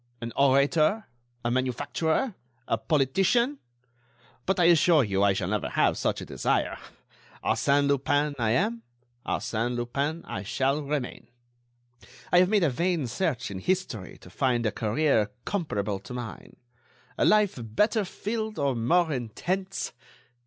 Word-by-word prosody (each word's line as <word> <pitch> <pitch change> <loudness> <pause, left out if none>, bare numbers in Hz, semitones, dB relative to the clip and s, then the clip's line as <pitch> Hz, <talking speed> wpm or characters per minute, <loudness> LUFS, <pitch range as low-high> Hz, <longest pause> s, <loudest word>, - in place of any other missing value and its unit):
An 115 0 -6
orator, 145 +9 +3 0.4
a 120 - +1
manufacturer, 130 - 0 0.3
a - - +2
politician.... 190 - +2 0.9
But, 190 0 +1
I - - +5
assure 165 -2 +5
you, 100 -3 0
I 100 -1 +4
shall 95 -1 -2
never 105 -1 -1
have - - +2
such - - -1
a - - -6
desire. - - -1 0.6
Arsène 140 0 +2
Lupin, 145 +1 +1
I 115 -2 +1
am; 215 - +1 0.5
Arsène 120 +2 -1
Lupin, 140 +7 -2
I 95 - -5
shall 135 +8 0
remain. 140 -3 -4 1.0
I 175 - +6
have 180 0 +4
made 210 -3 +3
a 155 - +3
vain 170 +2 0
search 125 - -2
in 95 - -5
history 125 - -2
to 90 - -14
find 120 +1 0
a 110 - +2
career 110 0 +1 0.2
comparable 105 - -2
to 110 +6 -9
mine; 120 -3 -8 0.6
a - - 0
life 210 -8 +3
better 210 - +1
filled 215 +3 -4
or 140 -2 +1
more 160 +8 +2
intense.... 180 - -3
140 Hz, 140 wpm, -27 LUFS, 115-180 Hz, 1.0 s, I